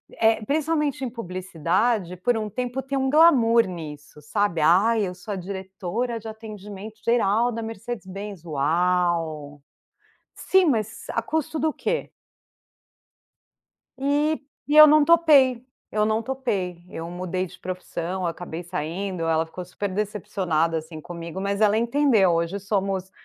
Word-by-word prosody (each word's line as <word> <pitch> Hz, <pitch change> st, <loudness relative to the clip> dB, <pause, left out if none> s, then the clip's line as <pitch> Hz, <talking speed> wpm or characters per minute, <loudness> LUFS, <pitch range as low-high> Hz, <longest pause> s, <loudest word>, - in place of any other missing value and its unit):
eh, 225 Hz, -1 st, +2 dB
principalmente 300 Hz, -1 st, 0 dB
em 250 Hz, -, -3 dB
publicidade, 185 Hz, -1 st, -1 dB
por 230 Hz, +6 st, +1 dB
um 215 Hz, -1 st, -3 dB
tempo 250 Hz, +4 st, -3 dB
tem 270 Hz, +1 st, -3 dB
um 265 Hz, 0 st, +1 dB
glamour 255 Hz, -7 st, +5 dB
nisso 150 Hz, -4 st, -9 dB
sabe. 170 Hz, +2 st, 0 dB
"Ai 200 Hz, +6 st, +4 dB
eu 180 Hz, -, -6 dB
sou 200 Hz, +3 st, -6 dB
a 195 Hz, -, -4 dB
diretora 195 Hz, +5 st, -4 dB
de 225 Hz, -, -10 dB
atendimento 215 Hz, -1 st, -9 dB
geral 235 Hz, 0 st, +2 dB
da 230 Hz, 0 st, -4 dB
Mercedes 225 Hz, 0 st, -6 dB
Benz, 195 Hz, -1 st, -7 dB
uau". 160 Hz, -1 st, 0 dB, 0.7 s
Sim 380 Hz, -1 st, +3 dB
mas 220 Hz, -7 st, -1 dB
a 230 Hz, -, -1 dB
custo 315 Hz, +4 st, -2 dB
do 310 Hz, 0 st, +1 dB
quê? 485 Hz, -, -2 dB, 1.9 s
E 290 Hz, +3 st, +1 dB, 0.3 s
e 300 Hz, -, +3 dB
eu 305 Hz, 0 st, +12 dB
não 305 Hz, 0 st, +6 dB
topei, 290 Hz, -7 st, +5 dB, 0.3 s
eu 210 Hz, 0 st, +1 dB
não 220 Hz, +1 st, +1 dB
topei, 200 Hz, -9 st, -3 dB
eu 165 Hz, +1 st, -6 dB
mudei 185 Hz, +1 st, -3 dB
de -, -, -14 dB
profissão, 185 Hz, 0 st, -4 dB
acabei 170 Hz, 0 st, -5 dB
saindo, 175 Hz, +2 st, -4 dB
ela 165 Hz, 0 st, +1 dB
ficou 180 Hz, +3 st, -8 dB
super 190 Hz, +3 st, -4 dB
decepcionada, 185 Hz, -5 st, -1 dB
assim, 160 Hz, 0 st, -6 dB
comigo 170 Hz, +2 st, -7 dB
mas 200 Hz, +2 st, -1 dB
ela 215 Hz, +1 st, +4 dB
entendeu 235 Hz, -6 st, +3 dB
hoje 170 Hz, +4 st, -1 dB
somos 195 Hz, -2 st, -2 dB
200 Hz, 140 wpm, -24 LUFS, 175-240 Hz, 1.9 s, eu